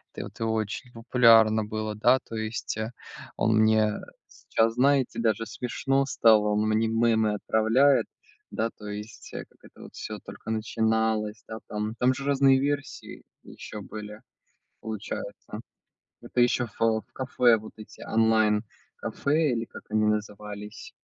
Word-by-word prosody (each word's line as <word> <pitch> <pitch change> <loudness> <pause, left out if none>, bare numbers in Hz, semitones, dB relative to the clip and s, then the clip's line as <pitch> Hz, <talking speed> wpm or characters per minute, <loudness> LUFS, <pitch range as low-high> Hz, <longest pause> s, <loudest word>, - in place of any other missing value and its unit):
это - - -5
вот, - - -11
и - - -2
очень 110 +2 -2
популярно 115 -2 +5
было, 110 0 -4
да. 120 +5 +4
То 115 - -8
есть, 110 0 -4
э, 110 +1 -3 0.5
он 110 0 +2
мне 110 -1 +4 0.4
сейчас, 115 0 0
знаете, 135 -1 +2
даже 115 -1 +1
смешно 135 +4 -1
стало, 110 -5 +4
он 105 +1 +1
мне 110 +1 +2
мемы 110 -1 +2
отправляет, 115 +7 +3 0.5
да, 115 - -1
то 105 - -10
есть, 105 +2 -8
э, - - -6
как - - -30
это - - -13
всё - - -6
только - - -11
начиналось, 110 -1 0
да, 110 - -6
там 105 +1 -3
там 125 +1 +3
же 135 +1 -6
разные 135 -1 +4
версии 145 0 -4 0.2
ещё 105 - -9
были, 105 +1 -9 0.6
получается, 110 -2 -6 0.6
это 125 - -2
ещё 120 0 +3
в 105 - -19 0.2
в - - -37
кафе, 125 -2 +3
вот 110 0 -11
эти 110 - -13
онлайн-кафе 110 +7 0
или 115 -1 -1
как - - -12
они 110 0 +2
назывались. 105 0 -4
110 Hz, 145 wpm, -27 LUFS, 110-120 Hz, 0.6 s, популярно